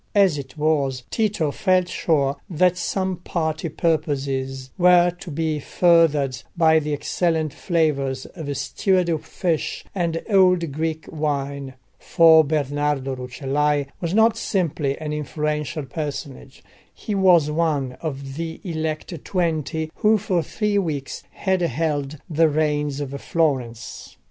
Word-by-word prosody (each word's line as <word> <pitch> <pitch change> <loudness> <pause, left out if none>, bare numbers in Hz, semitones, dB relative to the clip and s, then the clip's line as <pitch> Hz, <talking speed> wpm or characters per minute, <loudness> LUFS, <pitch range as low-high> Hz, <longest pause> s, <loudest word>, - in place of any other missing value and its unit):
As 190 -7 +4
it 135 +1 -10
was, 140 -4 0
Tito 205 -9 0
felt 185 0 +2
sure 140 -6 0
that 180 +1 +3
some 185 +1 -2
party 160 -2 -2
purposes 135 -5 -1
were 175 -1 +5
to 180 +1 -11
be 160 0 -1
furthered 150 -6 +3 0.2
by 160 -1 +5
the 150 0 -4
excellent 160 +1 0
flavours 140 -6 0
of 145 -6 -6
stewed 180 -5 0
fish 170 -4 -2
and 170 -3 -1
old 180 -6 +4
Greek 160 +2 -3
wine; 140 -3 -3 0.2
for 160 -2 +6
Bernardo 145 -2 -1
Rucellai 140 +3 -1 0.2
was 170 +2 -1
not 225 +1 +4
simply 160 -10 -1
an 150 -1 -4
influential 150 -1 -2
personage, 140 -1 -6 0.3
he 215 - -6
was 180 -6 +4
one 150 -5 0
of 140 -3 -5
the 165 0 -4
elect 160 -2 -4
Twenty 160 -3 -1
who 215 +1 +4
for 190 -4 0
three 210 +4 0
weeks 150 -7 -3
had 190 -2 -1
held 150 -1 -1
the 160 -1 +3
reins 150 -1 0
of 140 -2 -4
Florence. 130 -8 -2
155 Hz, 125 wpm, -22 LUFS, 140-170 Hz, 0.3 s, for